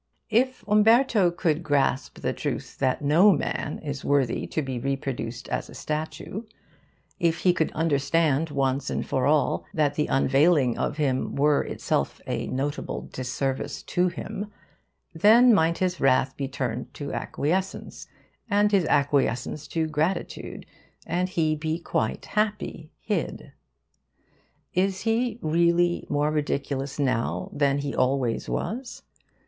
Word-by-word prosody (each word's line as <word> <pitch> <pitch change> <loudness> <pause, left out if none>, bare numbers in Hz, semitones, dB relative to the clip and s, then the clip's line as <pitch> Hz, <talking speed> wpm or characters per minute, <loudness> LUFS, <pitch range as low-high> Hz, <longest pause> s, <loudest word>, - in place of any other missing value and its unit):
If 255 +1 +1
Umberto 215 -1 +5
could 170 -2 0
grasp 140 -4 0
the - - -1
truth - - -4
that 130 +1 0
no 165 +9 +6
man 150 -5 -2
is 140 -2 -5
worthy 140 -4 +1
to 155 - -2
be 130 -2 -4
reproduced 135 -3 -3
as - - -3
a - - -11
statue; 155 +6 -4 0.8
if 165 -1 +1
he 180 - +4
could 160 -2 0
understand, 155 0 +1
once 135 -1 0
and - - -2
for 130 0 0
all, 150 0 +2
that 150 -3 +2
the 150 +1 0
unveiling 135 -1 +3
of 145 - -2
him 135 -4 0
were 145 +1 +3
itself 70 - -2
a - - -3
notable 145 +3 -3
disservice 130 +1 -3
to 180 +1 +1
him, 205 +3 -5 0.6
then 225 +8 +6
might 165 -3 +3
his 185 -2 -1
wrath 130 0 +3
be 140 - -3
turned 125 -3 -4
to 140 -1 -5
acquiescence, 185 +6 -3 0.4
and 205 0 +3
his 195 -4 +3
acquiescence 140 0 +1
to 160 -1 -1
gratitude, 155 +4 -2 0.4
and 180 +2 -1
he 155 -3 +1
be 155 +1 -2
quite 110 -9 -2
happy 210 -7 -2
hid. 210 - -3 1.2
Is 190 +1 +1
he, 230 0 0
really, 170 +2 +2
more 145 +1 +1
ridiculous 140 -2 -2
now 115 - -1
than 140 -1 +2
he 140 0 -3
always 130 -2 0
was? 245 +3 -4
155 Hz, 135 wpm, -26 LUFS, 135-180 Hz, 1.2 s, no